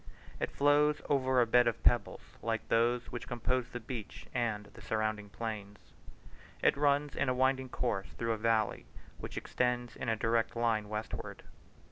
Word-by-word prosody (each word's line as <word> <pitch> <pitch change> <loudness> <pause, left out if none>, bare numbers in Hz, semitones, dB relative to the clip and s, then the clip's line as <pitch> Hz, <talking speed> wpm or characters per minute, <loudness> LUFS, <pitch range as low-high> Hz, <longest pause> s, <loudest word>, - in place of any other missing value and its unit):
It - - -1
flows 145 +1 +3
over 130 -2 +3
a - - +4
bed 120 +1 +5
of 115 - -1
pebbles, - - +1
like 115 0 -2
those 120 +1 +2
which 120 - -6
compose 125 0 -1
the 125 - -6
beach 115 -2 -7
and 115 -4 -1
the - - -13
surrounding 110 -1 -1
plains. 105 -1 -5 0.9
It - - +5
runs 145 0 +2
in 140 - +1
a 125 - +1
winding 130 0 +2
course 115 -6 -1
through 115 0 -2
a - - -3
valley, 110 -1 +1 0.3
which - - -7
extends 125 -1 -1
in 125 - -3
a 115 - +2
direct 115 +1 +1
line 115 -3 +1
westward. 105 +1 -5
120 Hz, 165 wpm, -32 LUFS, 110-130 Hz, 0.9 s, bed